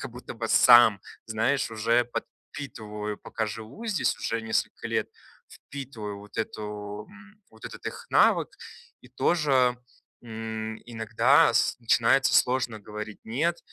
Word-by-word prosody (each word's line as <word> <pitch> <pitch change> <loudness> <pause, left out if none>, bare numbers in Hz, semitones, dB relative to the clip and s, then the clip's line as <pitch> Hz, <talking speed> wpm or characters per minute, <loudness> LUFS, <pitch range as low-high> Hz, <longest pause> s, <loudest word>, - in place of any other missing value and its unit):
как - - -6
будто 125 0 -9
бы 115 -1 -4
сам, 120 -5 +7 0.3
знаешь, 115 +3 0
уже 115 +2 +2
подпитываю, 105 -4 -7
пока 110 -1 -3
живу 115 - -8
здесь 210 -4 0
уже 115 0 -2
несколько 110 - -2
лет, - - -1 0.4
впитываю 115 -8 -8
вот 105 - -12
эту, 105 -1 -5
м, 210 0 -17
вот 110 0 -17
этот - - -10
их - - -6
навык, - - +4 0.5
и 125 - -16
тоже, 130 -2 +2 0.4
м, 110 -1 -5
иногда 120 +6 +3
с - - +2
начинается 120 +2 +3
сложно 125 -3 +2
говорить 105 0 -7
"нет", 155 +10 -1
115 Hz, 130 wpm, -27 LUFS, 110-130 Hz, 0.5 s, сам